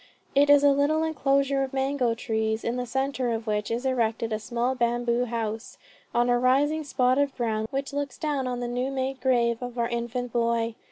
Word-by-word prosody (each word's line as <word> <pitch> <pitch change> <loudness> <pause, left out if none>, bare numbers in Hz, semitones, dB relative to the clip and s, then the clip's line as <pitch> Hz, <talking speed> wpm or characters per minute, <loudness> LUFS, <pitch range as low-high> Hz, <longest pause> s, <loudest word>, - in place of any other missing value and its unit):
It 285 +1 +4
is 290 0 +7
a 285 - +6
little 290 +3 +2
enclosure 275 -3 +1
of 270 0 -3
mango 265 -3 0
trees, 220 -1 -1
in 235 - -1
the 250 0 -3
centre 265 0 -1
of 225 -1 -2
which 210 -1 -1
is 235 +3 -2
erected 230 -3 0
a 215 - -1
small 240 +3 -1
bamboo 240 0 0
house, 225 -1 -4 0.3
on 240 0 +2
a 245 0 +3
rising 285 +5 +2
spot 260 -2 +1
of 285 -1 0
ground, 220 -3 -1
which 275 +1 -3
looks 285 -2 -3
down 285 -4 -1
on 245 -1 -3
the 245 - -2
new 250 +2 -2
made 265 -1 -3
grave 235 -2 +2
of 245 0 -6
our 235 0 0
infant 240 0 -3
boy. 230 -1 +1
245 Hz, 205 wpm, -26 LUFS, 235-275 Hz, 0.3 s, is